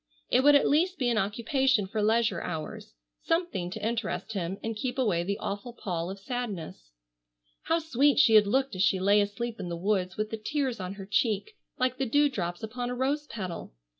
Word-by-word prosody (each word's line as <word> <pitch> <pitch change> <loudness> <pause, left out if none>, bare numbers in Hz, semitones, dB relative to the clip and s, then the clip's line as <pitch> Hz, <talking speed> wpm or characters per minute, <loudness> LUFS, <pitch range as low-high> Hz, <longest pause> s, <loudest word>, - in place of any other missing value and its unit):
It 255 - +5
would 290 +1 +7
at 285 - +5
least 350 +6 +2
be 250 -2 +1
an 225 - +2
occupation 235 +3 +1
for 210 +3 -2
leisure 220 -3 +2
hours, 155 - -6 0.3
something 330 - -1
to 210 +3 -5
interest 225 -1 -3
him 190 -1 -3
and 225 0 -2
keep 245 +4 -3
away 205 -10 +1
the 200 +3 -2
awful 205 +5 -5
pall 175 -6 -3
of 195 - -6
sadness. 195 - -5 0.8
How 330 - +2
sweet 290 -3 +2
she 225 - +6
had 210 -1 +7
looked 265 +4 +1
as 185 - -2
she 190 0 +3
lay 200 +2 +4
asleep 220 +3 -3
in 180 -3 -4
the 170 - -3
woods 190 0 0
with 215 0 -2
the 225 - -2
tears 270 -3 -1
on 185 +1 -5
her 195 -1 -8
cheek 215 - 0 0.2
like 255 0 0
the 265 - 0
dew 290 +5 +4
drops 175 -8 -4
upon 245 +2 -4
a 250 - -3
rose 285 +4 -1
petal! 185 - -6
220 Hz, 205 wpm, -28 LUFS, 190-260 Hz, 0.8 s, would